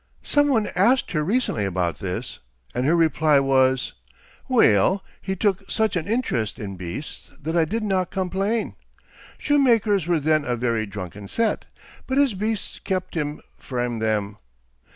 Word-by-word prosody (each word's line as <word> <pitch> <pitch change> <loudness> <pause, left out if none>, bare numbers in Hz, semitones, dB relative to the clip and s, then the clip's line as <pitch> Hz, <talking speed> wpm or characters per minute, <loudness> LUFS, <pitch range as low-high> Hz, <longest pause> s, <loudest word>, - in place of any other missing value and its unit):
Some 290 0 +3
one 230 -7 +2
asked 235 +8 +3
her 155 - 0
recently 200 - 0
about 90 -5 -1
this, 90 -2 -5 0.3
and 125 +2 0
her 165 - +4
reply 155 -3 +4
was: 130 -1 +2 0.6
"Weel, 185 - +4 0.2
he 190 0 -3
took 195 0 0
such 220 -2 +1
an 165 -3 -2
interest 205 - -1
in 100 -3 -6
beasts 90 - -7
that 160 +3 -3
I 165 -2 +4
didna 195 -1 0
compleen. 195 +4 -1 0.6
Shoemakers 230 - +3
were 170 -2 +2
then 155 0 +2
a 125 -2 -1
very 115 -2 -1
drucken 100 0 -7
set, 230 -1 0 0.4
but 260 - -1
his 280 -5 +4
beasts 215 +2 -3
keepit 185 -1 -2
him 150 -2 -3 0.2
frae 120 -2 -3
them. 105 -2 -1
160 Hz, 150 wpm, -23 LUFS, -, 0.6 s, her